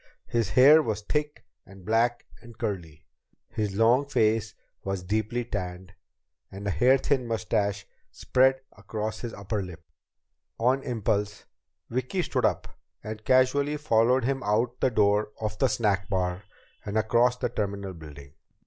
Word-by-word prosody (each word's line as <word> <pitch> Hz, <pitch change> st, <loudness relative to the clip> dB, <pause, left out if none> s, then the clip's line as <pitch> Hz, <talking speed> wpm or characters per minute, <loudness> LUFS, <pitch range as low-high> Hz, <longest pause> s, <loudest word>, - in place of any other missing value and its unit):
His 115 Hz, -4 st, -1 dB
hair 140 Hz, +10 st, +7 dB
was 110 Hz, -7 st, -3 dB
thick 150 Hz, +5 st, -3 dB, 0.2 s
and 95 Hz, -1 st, -15 dB
black 115 Hz, +2 st, +1 dB, 0.2 s
and 120 Hz, -1 st, -14 dB
curly, 85 Hz, -, -5 dB, 0.4 s
his 105 Hz, -4 st, -3 dB
long 120 Hz, +6 st, +3 dB
face 110 Hz, -4 st, +1 dB, 0.3 s
was 95 Hz, -2 st, -3 dB
deeply 110 Hz, +5 st, -1 dB
tanned, 90 Hz, -4 st, -5 dB, 0.6 s
and 100 Hz, +1 st, -8 dB
a 100 Hz, -, 0 dB
hair 130 Hz, +6 st, +4 dB
thin 130 Hz, -2 st, 0 dB
mustache 105 Hz, -2 st, -1 dB, 0.2 s
spread 130 Hz, +1 st, +2 dB, 0.2 s
across 110 Hz, 0 st, -5 dB
his 120 Hz, -, -5 dB
upper 100 Hz, 0 st, -3 dB
lip. 90 Hz, -3 st, -9 dB, 0.8 s
On 130 Hz, +4 st, +2 dB
impulse, 105 Hz, -4 st, -2 dB, 0.4 s
Vicki 130 Hz, +10 st, -2 dB
stood -, -, 0 dB
up -, -, -2 dB, 0.2 s
and 110 Hz, 0 st, -7 dB
casually 135 Hz, +4 st, +3 dB
followed 125 Hz, -2 st, +2 dB
him 135 Hz, +2 st, -1 dB
out 120 Hz, +3 st, 0 dB
the -, -, +3 dB
door 105 Hz, -2 st, +2 dB
of 110 Hz, -1 st, -4 dB
the 135 Hz, -, +4 dB
snack 100 Hz, -5 st, 0 dB
bar 90 Hz, 0 st, -2 dB, 0.4 s
and 105 Hz, +1 st, -3 dB
across 120 Hz, +3 st, +3 dB
the 125 Hz, -, -1 dB
terminal 100 Hz, -3 st, -3 dB
building. 75 Hz, -4 st, -12 dB
110 Hz, 145 wpm, -27 LUFS, 100-125 Hz, 0.8 s, hair